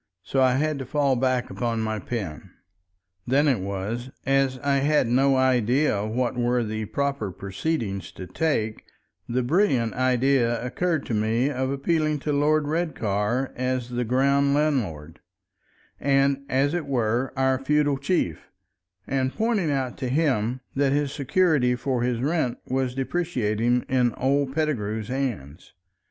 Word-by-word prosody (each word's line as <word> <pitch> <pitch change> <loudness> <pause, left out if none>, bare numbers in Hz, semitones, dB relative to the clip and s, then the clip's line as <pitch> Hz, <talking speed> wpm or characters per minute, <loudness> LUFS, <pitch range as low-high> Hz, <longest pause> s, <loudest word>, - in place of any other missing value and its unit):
So 135 - 0
I 130 -1 +4
had 150 +1 0
to 135 - -5
fall 140 -1 +2
back 130 0 0
upon 115 -2 -2
my 110 -1 -2
pen. 95 -7 -5 0.8
Then 140 +4 +3
it 130 -7 +2
was, 100 +6 -4 0.2
as 135 -1 +2
I 140 -1 +2
had 145 +1 +2
no 135 +3 +3
idea 125 -3 +2
what 120 +3 -1
were 120 0 +1
the 110 0 -3
proper 140 -4 -2
"proceedings" 100 - -3
to 95 - -8
take, 110 - -1 0.5
the 125 +1 0
brilliant 130 - +2
idea 130 -1 +2
occurred 160 +3 -1
to - - -4
me 110 +6 +1
of 130 -1 -1
appealing 155 +2 0
to 150 - -1
Lord 150 +1 +2
Redcar 130 - -1
as 125 -1 -2
the 125 0 -1
ground 140 +3 +2
landlord, 105 - -1 0.8
and, 140 0 +2
as 140 +3 +2
it 170 -4 -2
were, 120 -1 0
our 130 -1 +2
feudal 145 -1 +2
chief, 140 - -1 0.6
and 130 -1 0
pointing 220 -5 0
out 135 -3 -2
to 130 -3 -2
him 130 -4 0
that 140 0 +2
his 145 -1 0
security 145 -3 +2
for 125 -1 -1
his 120 -1 0
rent 145 -3 0
was 130 -1 -1
depreciating 125 -6 0
in 125 -3 +1
old 135 +1 0
Pettigrew's 110 -9 -1
hands. 115 - -4
130 Hz, 145 wpm, -25 LUFS, 120-140 Hz, 0.8 s, I